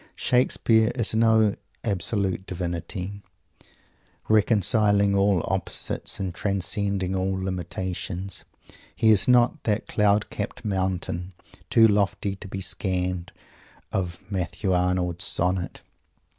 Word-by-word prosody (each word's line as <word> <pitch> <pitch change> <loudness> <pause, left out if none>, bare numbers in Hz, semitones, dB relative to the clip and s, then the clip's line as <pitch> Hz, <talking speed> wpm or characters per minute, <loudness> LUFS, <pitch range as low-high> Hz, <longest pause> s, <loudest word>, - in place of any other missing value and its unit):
Shakespeare 115 -2 +2
is 115 -4 0
no 110 -2 +4 0.3
Absolute 95 -1 -1
Divinity, 90 +2 -5 1.1
reconciling 105 -1 +3
all 100 -2 +3
oppositions - - -3
and 95 -2 -3
transcending 100 0 -1
all 95 0 -1
limitations. 95 0 -4 0.5
He 110 - +4
is 105 - +4
not 125 -1 +4
that 105 -1 0
"cloud 105 0 +1
capped 105 +3 -5
mountain," 95 -2 -2 0.4
too 115 -1 +6
lofty 100 -1 0
to 100 - -9
be 95 0 -5
scanned, 90 -1 -1 0.6
of 90 -2 -2
Matthew 95 0 -2
Arnold's 90 -1 +1
Sonnet. 90 0 0
95 Hz, 105 wpm, -25 LUFS, 90-105 Hz, 1.1 s, too